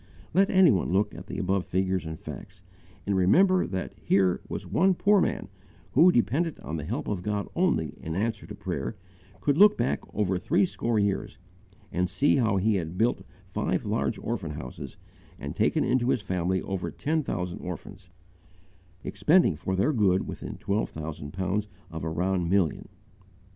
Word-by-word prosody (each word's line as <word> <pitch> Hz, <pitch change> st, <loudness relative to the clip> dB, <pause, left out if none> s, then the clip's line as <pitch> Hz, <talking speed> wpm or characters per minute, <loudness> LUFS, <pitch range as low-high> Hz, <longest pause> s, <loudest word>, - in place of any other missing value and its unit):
Let 195 Hz, +3 st, +4 dB
any 185 Hz, -5 st, +6 dB
one 95 Hz, -5 st, 0 dB
look 105 Hz, +3 st, +1 dB
at -, -, -10 dB
the -, -, -5 dB
above 95 Hz, -1 st, 0 dB
figures 95 Hz, -2 st, -1 dB
and 80 Hz, 0 st, -5 dB
facts, 95 Hz, +4 st, -10 dB, 0.4 s
and 100 Hz, -, 0 dB
remember 185 Hz, -, +4 dB
that 95 Hz, -1 st, -4 dB
here 95 Hz, -2 st, +2 dB
was -, -, -5 dB
one 190 Hz, +1 st, +3 dB
poor 205 Hz, +1 st, +4 dB
man -, -, -1 dB, 0.4 s
who, 175 Hz, -, +6 dB
dependent 145 Hz, +6 st, +1 dB
on 80 Hz, -, -4 dB
the 75 Hz, -, -5 dB
help 110 Hz, +9 st, -3 dB
of 100 Hz, -4 st, -2 dB
God 105 Hz, +1 st, -2 dB
only 170 Hz, -, +1 dB
in 80 Hz, 0 st, -4 dB
answer 110 Hz, +3 st, -2 dB
to -, -, -8 dB
prayer, -, -, -4 dB, 0.5 s
could 145 Hz, +1 st, +1 dB
look 210 Hz, +1 st, +7 dB
back 120 Hz, +2 st, 0 dB
over 95 Hz, -3 st, 0 dB
threescore 145 Hz, -, +1 dB
years 100 Hz, -2 st, -1 dB, 0.5 s
and 90 Hz, +1 st, 0 dB
see 140 Hz, +7 st, +3 dB
how 110 Hz, -6 st, +2 dB
he 105 Hz, +2 st, +2 dB
had 85 Hz, 0 st, -4 dB
built 115 Hz, +4 st, +2 dB, 0.2 s
five -, -, -2 dB
large -, -, -1 dB
orphan -, -, -4 dB
houses 65 Hz, +1 st, -8 dB, 0.4 s
and 70 Hz, 0 st, -6 dB
taken -, -, +2 dB
into 125 Hz, 0 st, +1 dB
his 120 Hz, -5 st, +1 dB
family 95 Hz, -1 st, -1 dB
over 95 Hz, -2 st, -3 dB
ten 160 Hz, +2 st, -1 dB
thousand 90 Hz, -10 st, -3 dB
orphans, 90 Hz, +1 st, -8 dB, 1.0 s
expending, 165 Hz, -, +3 dB
for 95 Hz, +5 st, -3 dB
their 100 Hz, +11 st, +2 dB
good, 95 Hz, -6 st, +2 dB
within -, -, -6 dB
twelve 100 Hz, +2 st, -1 dB
thousand 75 Hz, -2 st, -6 dB
pounds 95 Hz, +4 st, -1 dB, 0.2 s
of 80 Hz, 0 st, -6 dB
a 80 Hz, -, -1 dB
round 90 Hz, +1 st, 0 dB
million. 95 Hz, -5 st, +1 dB
95 Hz, 170 wpm, -27 LUFS, 90-125 Hz, 1.0 s, look